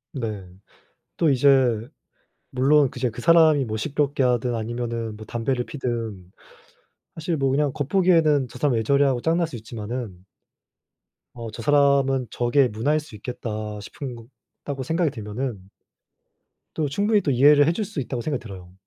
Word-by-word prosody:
네. 110 -7 -4 0.7
또 165 - +3
이제 140 0 +2 1.1
물론 140 +2 +3
그 125 - -10
제 125 - +1
그 115 +2 -8
사람이 160 -4 +5
뭐 110 -2 -4
시끄럽게 140 +2 -1
하든 125 -1 +1
아니면은 115 -1 -4
뭐 110 - -10
담배를 120 +3 -2
피우든 115 -9 -5 0.8
사실 160 +1 -2
뭐 135 -1 +1
그냥 140 0 +1
겉보기에는 155 -3 +2
'저 125 - -11
사람 140 -2 +1
왜 115 - +1
저래?' 140 +5 +3
하고 130 -3 0
짜증날 165 +1 +1
수 140 - -8
있지만은 110 -3 -7 1.1
어 115 -2 -6
'저 110 - -8
사람은 140 -3 +3
저게 125 +4 +2
문화일 125 +8 0
수 150 -7 -12
있겠다.' 105 -1 -5
싶은 125 +5 -7
거 115 -1 -13 0.4
다고 140 -2 -4
생각이 160 +3 0
들면은 110 -3 -5 1.1
또 155 -3 -1
충분히 205 +7 +2
또 145 - 0
이해를 145 +3 +6
해줄 175 +6 0
수 155 - -6
있다고 125 -2 -3
생각이 145 -2 -3
들어요. 95 -5 -11
130 Hz, 320 characters per minute, -23 LUFS, 115-145 Hz, 1.1 s, 이해를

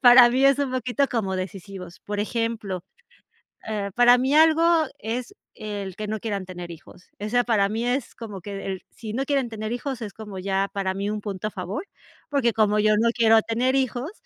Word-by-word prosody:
para 245 0 +9
mí, 260 +2 +2
es 275 0 +5
un 275 -2 -1
poquito 255 +2 +1
como 195 -6 -1
decisivos. 185 -1 -7
Por 205 0 -4
ejemplo, 215 -4 -2 0.8
eh, 205 -2 -2
para 245 +1 +7
mí 260 +3 +1
algo, 320 +1 +6 0.3
es 245 - -4 0.2
el 200 -3 -5
que 215 0 -5
no 215 +1 -2
quieran 200 -3 -3
tener 180 -1 -8
hijos, 170 +2 -13 0.2
eso, 230 +4 +1
para 205 -4 +2
mí, 225 +3 -2
es 250 +1 -1
como 210 -5 -8
que 200 +1 -6
el 190 -1 -4
si 220 -3 -8
no 265 +4 0
quieren 275 -3 +1
tener 215 -1 -5
hijos, 245 +1 -3
es 210 -3 -5
como, 210 -3 -8
ya 195 +1 0
para 190 -1 -1
mí 200 +1 -2
un 210 0 -3
punto 200 -1 -4
a - - -5
favor, 195 - -5 0.4
porque, 275 -5 +2
como 210 -1 +3
yo 215 0 +4
no 230 +2 +3
quiero 225 -1 +5
tener 245 +4 0
hijos, 260 - -1
220 Hz, 200 wpm, -24 LUFS, 200-245 Hz, 0.8 s, para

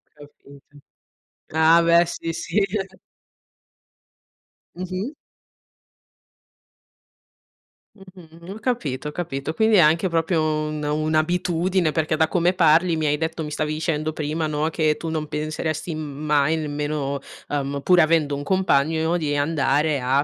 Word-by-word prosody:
Capito. 145 -1 -17 0.8
Ah, 160 +2 +5
beh! 170 +1 +4
Sì, 165 -1 -4
sì. 170 +5 -1 2.1
Mh-mh. 185 - -4 2.8
Mh-mh. 180 -3 -15
Ho - - -9
capito, 160 - -2
ho - - -7
capito. 155 -3 -4
Quindi 220 +5 +3
è 195 - +6
anche, 165 +3 +4
proprio, 165 0 +1
un 155 -1 -2
un'abitudine, 160 +3 0
perché 155 0 0
da 160 0 +2
come 175 +2 +1
parli 165 0 +4
mi 155 -1 -1
hai 150 0 +1
detto 160 0 -3
mi 150 - -6
stavi 150 0 -2
dicendo 155 -1 -2
prima, 155 +1 -2
no, 155 +1 -1
che 155 -2 +1
tu 165 - -5
non 155 -1 -3
penseresti 155 +2 -3
m 155 - -5 0.3
mai 150 +1 +2
nemmeno, 145 -2 -3 0.3
uhm, 140 -1 -2
pur 180 +2 +5
avendo 155 -3 +3
un 140 - -5
compagno 160 -1 +1
di 150 -3 -1
andare 145 0 +1
a 135 +3 +2
155 Hz, 130 wpm, -22 LUFS, 150-170 Hz, 2.8 s, è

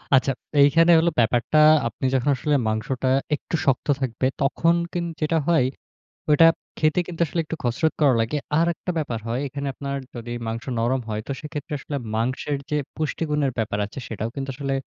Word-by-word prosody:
আচ্ছা 130 +1 +3 0.3
এইখানে 165 +4 +6
হইলো 170 +1 +3
ব্যাপারটা, 120 +5 +2 0.3
আপনি 115 +3 -5
যখন 130 +2 +1
আসলে 145 +4 0
মাংসটা 120 +4 -1 0.3
একটু 165 - -5
শক্ত 135 0 +1
থাকবে। 130 0 0
তখন 165 +5 +2 0.2
কিন্ 175 -1 -1 0.2
যেটা 160 +2 +1
হয়, 160 -7 +4 0.7
ওইটা 155 +2 +7 0.3
খেতে 155 +3 +2
কিন্তু 170 -2 -8
আসলে 165 - -2
একটু 160 - -5
কসরত 125 +7 +1
করা 140 -4 +5
লাগে। 115 +7 -1 0.2
আরেকটা 170 +2 0
ব্যাপার 125 -7 -2
হয় 120 +3 -1
এখানে 140 +1 -5
আপনার 140 0 -4 0.2
যদি 120 0 -6
মাংস 115 +2 -4
নরম 120 +3 +1
হয়, 105 -1 -2
তো - - -3
সেক্ষেত্রে 150 -1 -7
আসলে 145 +1 -5 0.2
মাংসের 130 +5 -1
যে 150 - +1 0.2
পুষ্টিগুণের 150 -2 -1
ব্যাপার 105 -2 -1
আছে 110 - -10
সেটাও 110 0 -4
কিন্তু 135 0 -4
আসলে 135 0 -2
140 Hz, 175 wpm, -23 LUFS, 120-155 Hz, 0.7 s, ওইটা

